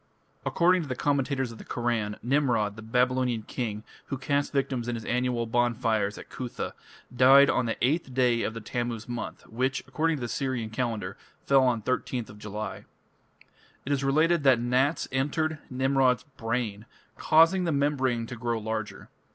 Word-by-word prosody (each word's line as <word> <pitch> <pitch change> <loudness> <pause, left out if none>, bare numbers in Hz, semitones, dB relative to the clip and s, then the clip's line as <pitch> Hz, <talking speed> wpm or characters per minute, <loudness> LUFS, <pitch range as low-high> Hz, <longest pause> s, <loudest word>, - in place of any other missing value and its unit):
According 180 +1 +3
to 155 - -6
the 130 - -3
commentators 135 -2 0
of 115 - -11
the - - -9
Koran, 115 -4 -2
Nimrod, 120 -6 +1
the 110 - -9
Babylonian 125 0 +1
king, 110 -2 -4 0.2
who 135 - -3
cast 140 +2 0
victims 135 -4 -1
in 120 - -1
his 115 - -6
annual 125 -1 0
bonfires 115 -3 0
at - - -10
Cuthah, 125 -2 -5 0.4
died 135 +3 +7
on 125 - 0
the 115 - -2
eighth 145 0 0
day 125 -2 +2
of 110 - -2
the 115 - -5
Tammuz 120 0 -3
month, 120 -1 -5
which, 130 +4 -1
according 160 0 0
to - - -8
the 120 - -2
Syrian 120 -2 -2
calendar, 110 -5 -3 0.3
fell 135 -1 +5
on 120 -4 +1
13th 125 -3 -2
July. 105 -1 -6 1.0
It 140 - -3
is 140 -1 +1
related 155 +4 +3
that 135 -4 +5
gnats 130 +6 +1
entered 150 +4 0
Nimrod's 130 -2 +2
brain, 115 -3 -3 0.3
causing 165 +4 +4
the 170 - +1
membrane 135 -5 +1
to 125 - -7
grow 115 0 -2
larger. 110 -1 -4
125 Hz, 165 wpm, -27 LUFS, 115-135 Hz, 1.0 s, died